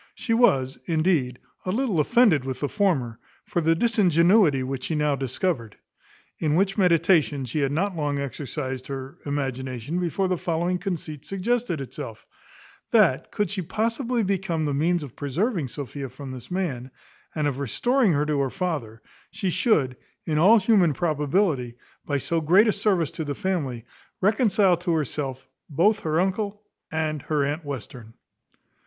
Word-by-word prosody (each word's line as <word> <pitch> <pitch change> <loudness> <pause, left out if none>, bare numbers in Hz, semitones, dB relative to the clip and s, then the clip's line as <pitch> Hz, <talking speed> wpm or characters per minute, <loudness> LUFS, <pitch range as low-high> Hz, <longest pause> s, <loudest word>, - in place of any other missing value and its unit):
She 230 - -2
was, 135 - +3
indeed, 155 -7 +1 0.3
a - - -4
little 220 -5 0
offended 200 - +4
with 130 -1 -4
the 145 - +1
former, 140 - 0 0.3
for 175 - -1
the 165 +1 +3
disingenuity 175 - +4
which 130 0 -4
she 160 - -1
now 150 -1 +1
discovered. 130 - -2 0.6
In 150 -1 +1
which 195 +2 +2
meditation 165 -6 +3
she 125 +5 -3
had 140 -1 +1
not 185 +6 0
long 145 -3 -1
exercised 135 -1 -4
her 135 -1 -7
imagination 130 +1 -3
before 180 +2 0
the 180 -2 -1
following 175 +1 -1
conceit 165 -6 -5
suggested 200 -1 -1
itself; 115 -4 -8 0.6
that - - +3
could 205 -1 -1
she 200 -2 -2
possibly 230 - -1
become 185 -5 -1
the 145 - -1
means 165 +4 +1
of 135 -5 -10
preserving 165 - -1
Sophia 135 +1 -6
from 135 +2 -9
this 125 -2 -9
man, 150 -10 -3 0.5
and 155 -2 0
of 140 -2 -1
restoring 235 - +2
her 145 0 +1
to 150 -1 0
her 135 -1 +1
father, 125 - -4 0.3
she 195 -2 -2
should, 150 - +2 0.3
in 155 -2 0
all 205 +8 +7
human 190 - +3
probability, 150 - 0 0.3
by 145 - +1
so 165 +4 -1
great 185 +8 +5
a - - +4
service 195 -6 +1
to 160 - -4
the 145 -2 -4
family, 150 - -2 0.3
reconcile 200 -3 +3
to 175 0 -1
herself 140 -3 -3 0.2
both 200 +9 +3
her 160 -3 0
uncle 200 +3 -1 0.3
and 155 -2 -1
her 150 -1 0
aunt 150 +4 -3
Western. 125 -4 -8
160 Hz, 160 wpm, -25 LUFS, 140-190 Hz, 0.6 s, all